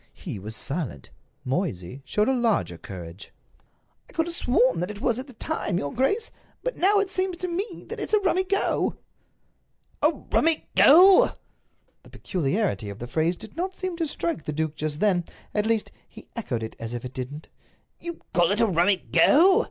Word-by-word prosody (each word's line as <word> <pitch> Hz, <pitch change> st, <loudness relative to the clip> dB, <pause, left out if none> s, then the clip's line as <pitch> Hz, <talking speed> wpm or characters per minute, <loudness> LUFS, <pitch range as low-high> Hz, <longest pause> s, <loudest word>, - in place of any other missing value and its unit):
He 100 Hz, -, -6 dB
was 110 Hz, +3 st, -7 dB
silent. 135 Hz, -, -4 dB, 0.3 s
Moysey 130 Hz, -, -3 dB
showed 210 Hz, +1 st, +1 dB
a 265 Hz, -, +3 dB
larger 230 Hz, -, +1 dB
courage. 90 Hz, -1 st, -9 dB, 0.8 s
"I -, -, -16 dB
could 325 Hz, -, +1 dB
have 340 Hz, 0 st, -5 dB
sworn 250 Hz, -, +2 dB
that 180 Hz, -, -2 dB
it 205 Hz, -1 st, -7 dB
was 240 Hz, +2 st, 0 dB
at 260 Hz, -, -7 dB
the 260 Hz, -, -13 dB
time, 265 Hz, -, -2 dB
your 145 Hz, -4 st, -3 dB
grace. 405 Hz, -, 0 dB, 0.3 s
But -, -, -2 dB
now 400 Hz, +4 st, +3 dB
it 400 Hz, -1 st, +1 dB
seems 370 Hz, -1 st, -1 dB
to 365 Hz, -, -3 dB
me 365 Hz, +2 st, -4 dB
that -, -, -6 dB
it's -, -, -4 dB
a -, -, +4 dB
rummy 375 Hz, -1 st, +2 dB
go." 395 Hz, +1 st, 0 dB, 1.0 s
"A -, -, +5 dB
rummy 325 Hz, 0 st, +1 dB
go!" 365 Hz, +6 st, +7 dB, 0.7 s
The -, -, -18 dB
peculiarity 180 Hz, -, -1 dB
of 100 Hz, -, -7 dB
the 120 Hz, -, -6 dB
phrase 160 Hz, +8 st, 0 dB
did 220 Hz, -, -11 dB
not 375 Hz, +3 st, -3 dB
seem 370 Hz, -2 st, -3 dB
to 330 Hz, -2 st, -1 dB
strike 170 Hz, -, -3 dB
the 150 Hz, -, -3 dB
duke 155 Hz, 0 st, -2 dB
just 155 Hz, 0 st, -3 dB
then—at 210 Hz, +2 st, -1 dB
least, 225 Hz, -2 st, 0 dB, 0.2 s
he -, -, -14 dB
echoed 130 Hz, -, -3 dB
it 110 Hz, -, -6 dB
as 115 Hz, +1 st, -5 dB
if 120 Hz, -, -6 dB
it 125 Hz, -, -7 dB
didn't. 140 Hz, +5 st, -7 dB, 0.5 s
"You 340 Hz, -1 st, -7 dB
call 175 Hz, -1 st, +4 dB
it 205 Hz, +3 st, +1 dB
a 230 Hz, -, +5 dB
rummy 185 Hz, 0 st, +3 dB
go! 370 Hz, -, +5 dB
210 Hz, 190 wpm, -25 LUFS, -, 1.0 s, go